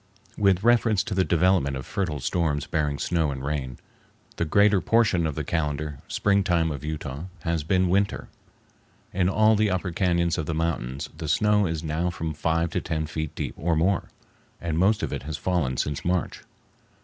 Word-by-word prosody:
With 100 -2 +2
reference 115 -3 +3
to 115 - -4
the 95 0 +2
development 85 -6 +2
of 65 - -7
fertile 85 -7 -2
storms 75 +1 0
bearing 75 -2 -1
snow 80 0 0
and 70 -1 -5
rain, 70 -4 -3 0.6
the 85 - 0
greater 100 +4 +4
portion 100 -6 +2
of 75 - -4
the - - -2
calendar 75 -3 -2
springtime 90 -5 +1
of 70 -1 -6
Utah 75 -1 -5 0.2
has 85 -2 -1
been 90 +3 +2
winter. 100 +3 0 0.9
In 90 -1 +2
all 110 +2 +4
the 105 0 +2
upper 95 -1 -1
cañons 85 -1 +1
of 75 - -3
the 80 - -2
mountains 70 -5 -2
the 80 - -6
snow 105 +5 +3
is 80 -1 -3
now 80 +3 -1
from 80 -2 -4
five 80 +2 0
to - - -1
ten 80 -1 -2
feet 80 -1 -4
deep - - -3
or 85 +1 0
more, 90 +4 +1 0.5
and 85 -2 -2
most 100 +4 +3
of - - -2
it - - -3
has 75 +1 -5
fallen 75 -6 -1
since 75 -1 -2
March. 90 -1 -1
85 Hz, 185 wpm, -25 LUFS, 75-95 Hz, 0.9 s, greater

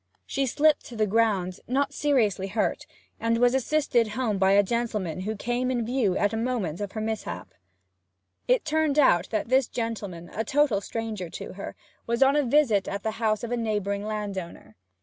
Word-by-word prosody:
She 270 0 -1
slipped 300 +4 +3
to 240 - -9
the 215 -1 +2
ground, 200 -4 +1
not 275 +3 0
seriously 225 -11 +1
hurt, 210 +2 -1 0.3
and 230 0 +1
was 245 +1 +4
assisted 265 -3 +2
home 220 -6 0
by 190 0 +4
a 200 +1 +6
gentleman 210 -6 -2
who 215 +4 -3
came 245 +4 -1
in 240 -3 0
view 235 -6 +1
at 205 - +2
the 225 - -2
moment 225 -8 -2
of 200 -2 -4
her 220 - -3
mishap. 220 0 -4 0.9
It - - +3
turned 310 -1 +1
out 185 - +4
that 215 0 -2
this 260 -1 +3
gentleman, 205 -7 -5
a 220 - -1
total 265 -4 +2
stranger 215 -5 -4
to - - -7
her, 195 - -7 0.3
was 235 +3 +3
on 270 +1 +4
a 295 - +4
visit 240 -7 +3
at 200 0 -4
the 220 - 0
house 215 -1 +1
of 235 - -4
a 245 - 0
neighbouring 205 -3 -1
landowner. 200 - -5
225 Hz, 190 wpm, -26 LUFS, 200-255 Hz, 0.9 s, a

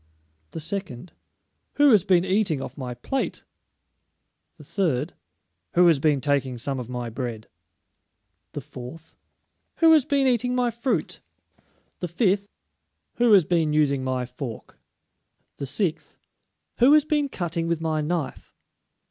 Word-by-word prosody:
The - - -7
second, 175 -3 -5 0.6
"Who 290 -1 +5
has 210 -6 +5
been 180 -1 +3
eating 190 -5 +1
off 135 -1 -7
my 125 -3 -6
plate?" 265 - -3 1.1
The - - -13
third, 160 -5 -1 0.6
"Who 175 +1 +6
has 165 -5 +5
been 145 -2 +2
taking 140 -3 0
some 135 +3 -3
of 125 -1 -7
my 125 -2 -4
bread?" 115 -3 -5 1.1
The - - -5
fourth, 135 +7 -11 0.6
"Who 330 -1 +5
has 310 -3 +5
been 275 +1 +1
eating 250 0 +1
my 245 -1 +1
fruit?" 235 +3 -2 0.8
The 180 - -3
fifth, 195 +3 +1 0.7
"Who 240 -1 +3
has 190 -6 +6
been 160 -3 +1
using 140 -3 +2
my 130 -1 -1
fork?" 125 -2 -8 0.8
The 140 - -4
sixth, 170 +2 -2 0.6
"Who 255 +5 +6
has 305 -1 +5
been 295 -2 0
cutting 170 -6 -3
with 170 -1 0
my 160 -1 -1
knife?" 160 -1 -4
165 Hz, 140 wpm, -24 LUFS, 135-215 Hz, 1.1 s, Who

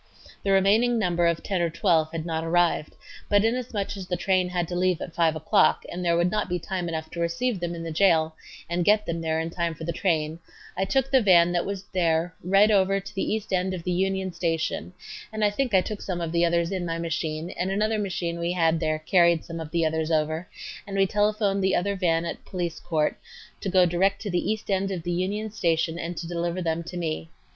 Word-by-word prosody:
The 200 - -2
remaining 210 +5 +4
number 175 -5 +2
of 170 -1 0
ten 190 -3 -1
or 170 - +1
twelve 165 -3 +2
had 165 -1 -4
not 160 -1 -2
arrived, 170 -2 +1 0.3
but 205 +1 +4
inasmuch 225 -4 -2
as 190 -2 -7
the 180 - -1
train 185 -2 +1
had 175 -2 -1
to 175 - -3
leave 180 -1 +1
at 170 - -7
5 165 -1 +2
o'clock 155 0 +3
and 180 +1 -4
there 170 -1 +2
would 175 +1 +2
not 210 -2 -1
be 180 - 0
time 180 0 -3
enough 160 -1 -4
to 170 - -6
receive 180 +7 -1
them 175 0 -3
in 165 - -6
the 165 - -4
jail 160 -2 +3 0.3
and 175 +1 0
get 210 +3 +3
them 170 0 -3
there 160 -1 0
in 165 +1 -3
time 170 -1 -2
for 160 - -9
the 170 +1 -2
train, 160 -3 0 0.4
I 190 - 0
took 270 +6 0
the 265 -2 +5
van 175 -4 +5
that 175 -1 0
was 200 -1 -4
there 170 -1 +1
right 195 +4 +4
over 195 -1 +3
to 195 +1 -10
the 195 - -2
east 215 -2 -3
end 185 0 0
of 170 - -7
the 180 - -2
Union 190 +1 0
Station, 165 0 -2 0.4
and 215 -1 0
I 205 - +3
think 255 +4 -1
I 185 - +6
took 210 +2 -5
some 180 -3 -3
of 165 -2 -3
the 170 0 +3
others 170 +1 +1
in 190 -2 -2
my 165 -1 -2
machine 165 0 -3
and 185 0 -2
another 215 +2 0
machine 175 -4 -2
we 170 +1 -1
had 165 -2 +2
there 155 -1 0
carried 170 +1 +3
some 165 -1 -6
of 160 -2 -6
the 165 0 +1
others 160 0 -1
over, 155 +2 0 0.4
and 195 -1 -4
we 195 - +5
telephoned 205 -1 +1
the 190 - +2
other 200 +3 0
van 170 -3 +1
at - - -5
Police 175 -3 -4
Court 155 -3 -1 0.4
to 195 - -3
go 185 -1 +5
direct 190 +3 +1
to 205 - -3
the 175 +4 0
east 215 -1 -4
end 195 0 +1
of 185 -4 -4
the 175 - -2
Union 200 +5 -2
Station 165 -4 0
and 170 0 -5
to 170 - -4
deliver 170 +1 -2
them 165 -2 -1
to 180 - -6
me. 165 -1 -3
175 Hz, 240 wpm, -26 LUFS, 165-195 Hz, 0.4 s, I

